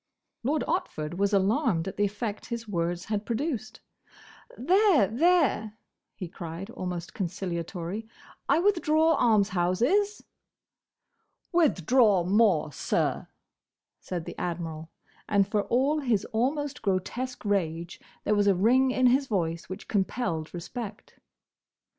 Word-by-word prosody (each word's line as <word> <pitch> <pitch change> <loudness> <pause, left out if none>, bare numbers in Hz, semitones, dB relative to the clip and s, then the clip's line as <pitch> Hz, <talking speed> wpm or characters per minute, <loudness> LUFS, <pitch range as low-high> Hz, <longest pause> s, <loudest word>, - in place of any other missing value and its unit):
Lord 290 +5 0
Otford 175 - -2
was 200 +1 +1
alarmed 200 - +2
at 190 - -5
the 205 - +2
effect 205 +1 -4
his 235 -1 -5
words 175 -2 -2
had 210 -1 -2
produced. 245 +1 -3 0.8
"There! 365 - +4
there!" 255 - +2 0.4
he 185 - -6
cried, 170 +3 -7
almost 180 -4 -5
conciliatorily, 180 +1 -4 0.4
"I - - +5
withdraw 325 -4 +3
'Almshouses!'" 230 - +2 1.3
"Withdraw 240 - +3
more, 185 -5 +3
sir!" - - -1 0.7
said 175 -3 -5
the - - -6
Admiral, 165 -2 -4 0.4
and 200 -2 +3
for 205 0 0
all 275 +5 +2
his 235 -8 0
almost 280 +5 -1
grotesque 225 +6 -2
rage, 170 -4 -1 0.2
there 210 - +1
was 205 -1 +2
a 195 - +5
ring 250 +8 +4
in 255 0 +1
his 265 +3 +4
voice 170 -6 -2
which 185 - -7
compelled 190 -6 -1
respect. 205 +5 -8
210 Hz, 115 wpm, -27 LUFS, 180-255 Hz, 1.3 s, I